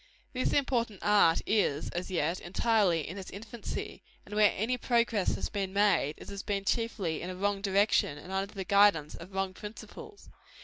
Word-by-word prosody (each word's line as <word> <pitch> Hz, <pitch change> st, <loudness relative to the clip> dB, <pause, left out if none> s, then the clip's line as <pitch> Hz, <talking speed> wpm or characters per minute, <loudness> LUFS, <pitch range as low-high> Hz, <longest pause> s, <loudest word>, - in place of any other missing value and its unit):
This 255 Hz, 0 st, 0 dB
important 235 Hz, -7 st, 0 dB
art 205 Hz, -6 st, +4 dB
is, 190 Hz, -9 st, +1 dB
as 175 Hz, +2 st, -4 dB
yet, 170 Hz, -1 st, 0 dB
entirely 185 Hz, -4 st, +1 dB
in 185 Hz, +5 st, -6 dB
its 190 Hz, -, -8 dB
infancy; 220 Hz, +3 st, -7 dB, 0.2 s
and -, -, -11 dB
where 210 Hz, -1 st, +5 dB
any 225 Hz, +5 st, 0 dB
progress 235 Hz, -5 st, +1 dB
has -, -, -3 dB
been 195 Hz, -2 st, -3 dB
made, 200 Hz, -7 st, +2 dB
it -, -, -12 dB
has 200 Hz, -1 st, -5 dB
been 200 Hz, -1 st, -3 dB
chiefly 205 Hz, -8 st, -1 dB
in 180 Hz, -, -5 dB
a 185 Hz, -, -5 dB
wrong 200 Hz, +1 st, -1 dB
direction, 200 Hz, -6 st, +2 dB
and 175 Hz, +6 st, -10 dB
under 195 Hz, +1 st, -2 dB
the 195 Hz, -, -3 dB
guidance 200 Hz, -7 st, +4 dB
of 175 Hz, +3 st, -10 dB
wrong 190 Hz, 0 st, -2 dB
principles. 235 Hz, -, -10 dB
200 Hz, 180 wpm, -30 LUFS, 185-215 Hz, 0.2 s, where